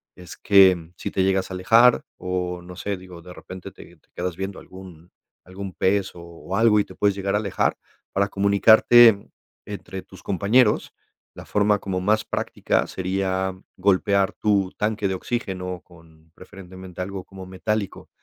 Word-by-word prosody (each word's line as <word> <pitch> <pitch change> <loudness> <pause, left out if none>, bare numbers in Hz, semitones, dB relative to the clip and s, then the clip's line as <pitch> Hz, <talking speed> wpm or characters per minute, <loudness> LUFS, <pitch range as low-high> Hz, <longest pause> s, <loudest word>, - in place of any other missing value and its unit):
es 90 -2 -12
que, 95 -2 +6
mm, 85 0 -13
si - - -5
te 95 - 0
llegas 95 0 0
a - - -4
alejar 115 +6 +4
o, 90 -1 -3
no 90 0 -11
sé, 100 +2 -4
digo, 90 -2 -12
de 90 - -11
repente 95 +1 -10
te 85 -2 -15
te - - -37
quedas 90 -1 -3
viendo 95 0 -5
algún 90 -3 -14 0.3
algún 95 0 -8
pez 100 0 0
o 85 - -10
o 85 +2 -8
algo 110 -2 +4
y - - +1
te - - -14
puedes 100 -1 +1
llegar 100 0 -2
a - - +2
alejar, 100 -3 -1 0.4
para 100 +1 +1
comunicarte, 100 +2 +5 0.4
entre 95 -2 -7
tus 95 - -16
compañeros, 105 +4 +2 0.4
la - - -10
forma 105 0 +1
como 95 -1 -3
más 110 +3 +1
práctica - - -1
sería 95 0 -2 0.2
golpear 100 +1 +2
tu 100 -3 0
tanque 105 -1 -1
de 95 - -2
oxígeno 90 -4 -4
con 80 -2 -21
preferentemente 95 -1 -11
algo 95 0 -6
como 95 -1 -11
metálico, 100 +2 -4
95 Hz, 170 wpm, -23 LUFS, 90-100 Hz, 0.4 s, que